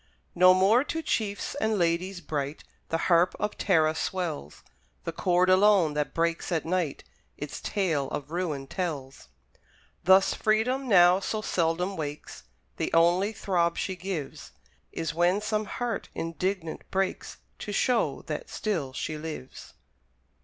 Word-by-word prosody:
No 185 Hz, +1 st, +6 dB
more 205 Hz, +7 st, +4 dB
to 325 Hz, +1 st, -3 dB
chiefs 205 Hz, -7 st, -2 dB
and 220 Hz, -1 st, +1 dB
ladies 175 Hz, +2 st, 0 dB
bright 145 Hz, -2 st, -4 dB, 0.3 s
The 165 Hz, -, +1 dB
harp 175 Hz, 0 st, +4 dB
of 210 Hz, -, -2 dB
Tara 160 Hz, -5 st, +3 dB
swells; 160 Hz, -, -4 dB, 0.4 s
The -, -, -3 dB
chord 180 Hz, +2 st, +2 dB
alone, 185 Hz, -4 st, +5 dB
that 150 Hz, 0 st, -2 dB
breaks 165 Hz, +2 st, 0 dB
at 165 Hz, -2 st, 0 dB
night, 170 Hz, -4 st, -1 dB, 0.3 s
Its 145 Hz, 0 st, -6 dB
tale 165 Hz, -9 st, -1 dB
of 145 Hz, +1 st, -5 dB
ruin 165 Hz, -6 st, -2 dB
tells. 140 Hz, -, -5 dB, 0.8 s
Thus 190 Hz, +2 st, +5 dB
Freedom 250 Hz, +5 st, +1 dB
now 180 Hz, -3 st, +6 dB
so 215 Hz, +2 st, -3 dB
seldom 175 Hz, +2 st, 0 dB
wakes, 150 Hz, -2 st, -6 dB, 0.3 s
The -, -, -2 dB
only 175 Hz, +5 st, +4 dB
throb 175 Hz, -5 st, 0 dB
she 190 Hz, -, -2 dB
gives, 180 Hz, -6 st, -6 dB, 0.4 s
Is 160 Hz, -2 st, -3 dB
when 175 Hz, +4 st, +2 dB
some 215 Hz, 0 st, -1 dB
heart 235 Hz, -1 st, -4 dB
indignant 165 Hz, 0 st, -3 dB
breaks, 190 Hz, 0 st, -2 dB, 0.2 s
To 210 Hz, -, -5 dB
show 205 Hz, -, +1 dB
that 150 Hz, -2 st, -5 dB
still 165 Hz, -12 st, -2 dB
she 155 Hz, +3 st, -4 dB
lives. 155 Hz, -4 st, -8 dB
175 Hz, 140 wpm, -27 LUFS, 160-195 Hz, 0.8 s, No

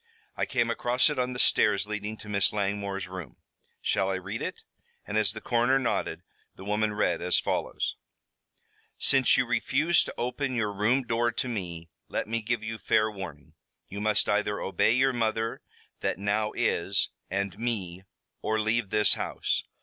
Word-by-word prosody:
"I -, -, -1 dB
came 120 Hz, -3 st, +1 dB
across 125 Hz, +5 st, +2 dB
it 145 Hz, -, -2 dB
on 125 Hz, 0 st, 0 dB
the -, -, -5 dB
stairs 105 Hz, -4 st, +4 dB
leading 105 Hz, +1 st, -4 dB
to 105 Hz, -, -12 dB
Miss 100 Hz, -2 st, +2 dB
Langmore's 100 Hz, -1 st, -2 dB
room. 90 Hz, -7 st, -8 dB, 0.5 s
Shall 95 Hz, -1 st, +1 dB
I 95 Hz, -, 0 dB
read 100 Hz, +4 st, -5 dB
it?" -, -, -4 dB, 0.4 s
And 105 Hz, -, -4 dB
as 105 Hz, -3 st, +3 dB
the 110 Hz, -, -7 dB
coroner 120 Hz, +2 st, +3 dB
nodded, 130 Hz, -3 st, -1 dB, 0.3 s
the 95 Hz, -, -11 dB
woman 105 Hz, +1 st, +1 dB
read 90 Hz, -5 st, +1 dB
as 90 Hz, +1 st, +2 dB
follows: -, -, -1 dB, 1.0 s
"Since 135 Hz, -2 st, +4 dB
you 130 Hz, -, +3 dB
refuse 145 Hz, +7 st, +3 dB
to -, -, -6 dB
open 125 Hz, +2 st, -2 dB
your 105 Hz, -3 st, 0 dB
room 115 Hz, +7 st, +2 dB
door 120 Hz, 0 st, +1 dB
to -, -, -2 dB
me, 85 Hz, -8 st, -5 dB, 0.2 s
let -, -, -2 dB
me 115 Hz, +1 st, -1 dB
give 110 Hz, +1 st, -1 dB
you 110 Hz, 0 st, -4 dB
fair 110 Hz, 0 st, +2 dB
warning. 85 Hz, -9 st, -8 dB, 0.4 s
You 100 Hz, +2 st, -5 dB
must 105 Hz, 0 st, +2 dB
either 105 Hz, 0 st, +1 dB
obey 95 Hz, +3 st, +2 dB
your 135 Hz, +1 st, +3 dB
mother 115 Hz, -1 st, -1 dB, 0.4 s
that -, -, -1 dB
now 105 Hz, +2 st, 0 dB
is, 95 Hz, +3 st, +1 dB, 0.2 s
and 100 Hz, +1 st, -2 dB
me, 100 Hz, -7 st, -2 dB, 0.4 s
or 110 Hz, 0 st, 0 dB
leave 110 Hz, 0 st, +1 dB
this 105 Hz, +1 st, +4 dB
house. -, -, -1 dB
110 Hz, 170 wpm, -28 LUFS, 100-120 Hz, 1.0 s, stairs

